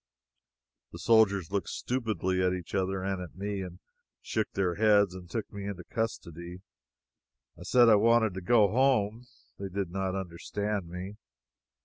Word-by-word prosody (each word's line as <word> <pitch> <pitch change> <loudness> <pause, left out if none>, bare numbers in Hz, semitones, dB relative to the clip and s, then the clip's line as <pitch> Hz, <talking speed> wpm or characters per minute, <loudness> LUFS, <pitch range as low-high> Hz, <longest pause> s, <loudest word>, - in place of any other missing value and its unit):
The - - -7
soldiers 100 -6 +3
looked 100 -1 -1
stupidly 110 -7 -1
at 90 0 +2
each 90 -2 -8
other 95 -1 -1
and 95 -1 -2
at 90 -4 -9
me, 100 +1 -3
and 90 -2 -7 0.4
shook 110 -2 -2
their 95 -3 +1
heads 100 -1 +4
and 90 -2 -10
took 110 +2 -4
me 100 -1 -5
into 95 -3 -5
custody. 90 -5 -5 0.9
I - - -16
said 120 -1 +5
I 110 - +8
wanted 110 -1 +4
to 95 - -5
go 110 +2 +5
home. 120 -2 +2 0.3
They 100 -1 -4
did 95 -2 -3
not 95 0 -2
understand 95 +2 -3
me. 90 +4 -7
100 Hz, 155 wpm, -29 LUFS, 90-110 Hz, 0.9 s, I